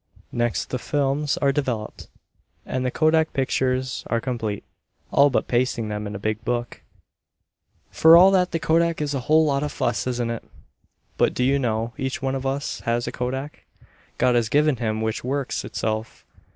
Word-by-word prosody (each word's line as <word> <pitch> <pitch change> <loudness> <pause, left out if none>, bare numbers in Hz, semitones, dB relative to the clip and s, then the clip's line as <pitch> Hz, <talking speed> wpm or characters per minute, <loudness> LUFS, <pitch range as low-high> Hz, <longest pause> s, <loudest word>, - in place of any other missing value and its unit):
Next 120 -1 -1
the 125 - -2
films 145 +1 0
are 140 - +4
developed, 125 -7 -3 0.6
and 130 0 -2
the 130 - 0
kodak 160 +3 +2
pictures 130 -1 -1
are 115 - 0
complete, 115 -5 -3 0.5
all 140 +1 +5
but 135 - 0
pasting 120 -2 0
them 105 0 -4
in 100 - -6
a 100 - -8
big 110 +1 -1
book. 120 0 -3 1.1
For 165 +1 +7
all 185 +2 +8
that 185 -2 +3
the 165 - -1
kodak 165 +1 +1
is 145 -1 -2
a 135 - -1
whole 160 +1 +5
lot 140 -2 +1
of 150 - -2
fuss, 120 +1 -1
isn't 120 -2 -1
it? 115 - -5 0.7
But, - - +2
do 125 - 0
you 135 +2 +3
know, 115 -2 -1
each 130 0 -2
one 135 0 -2
of 135 0 -2
us 140 +2 -3
has 120 +1 -1
a - - -3
kodak 130 +4 -5 0.5
God 125 - +3
has 120 -2 +1
given 150 0 +3
him 110 -1 -2
which 110 0 -2
works 135 +1 -2
itself. 110 0 -4
130 Hz, 180 wpm, -23 LUFS, 115-145 Hz, 1.1 s, all